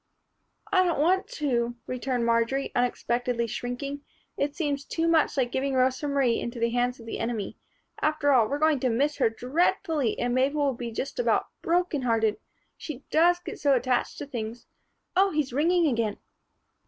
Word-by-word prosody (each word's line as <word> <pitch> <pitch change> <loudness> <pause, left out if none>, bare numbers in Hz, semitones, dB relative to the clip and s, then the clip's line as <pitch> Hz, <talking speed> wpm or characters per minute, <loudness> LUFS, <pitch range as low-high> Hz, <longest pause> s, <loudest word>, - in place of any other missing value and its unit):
"I 375 -2 +5
don't 345 -5 0
want 375 +6 +2
to," 240 -8 -1
returned 255 -1 -2
Marjory, 235 +4 +1
unexpectedly 245 -1 0
shrinking. 245 +5 -4 0.3
"It 285 0 -1
seems 290 -4 -1
too 330 +3 -1
much 325 -3 +3
like 245 -2 +1
giving 270 0 -1
Rosa 260 +3 +1
Marie 275 -5 +2
into 235 0 -5
the 230 0 +1
hands 245 +1 0
of 230 - -12
the 225 - -5
enemy. 225 -3 -3 0.4
After 305 -2 +2
all, 240 -5 +5
we're 285 - -1
going 310 -2 +3
to 255 - +1
miss 285 +6 +1
her 265 - +3
dreadfully 290 - 0
and 245 0 -1
Mabel'll 275 +2 +2
be 240 -1 -5
just 265 - -4
about - - +1
broken 345 -4 +1
hearted. 225 -3 +1 0.4
She 290 -3 -7
does 345 +2 +5
get - - -7
so 280 -2 +3
attached 250 0 0
to - - -5
things 235 -3 -6 0.5
Oh! 390 +2 +5
He's 300 -7 -1
ringing 335 +5 +3
again." 230 -7 0
265 Hz, 170 wpm, -27 LUFS, 240-300 Hz, 0.5 s, I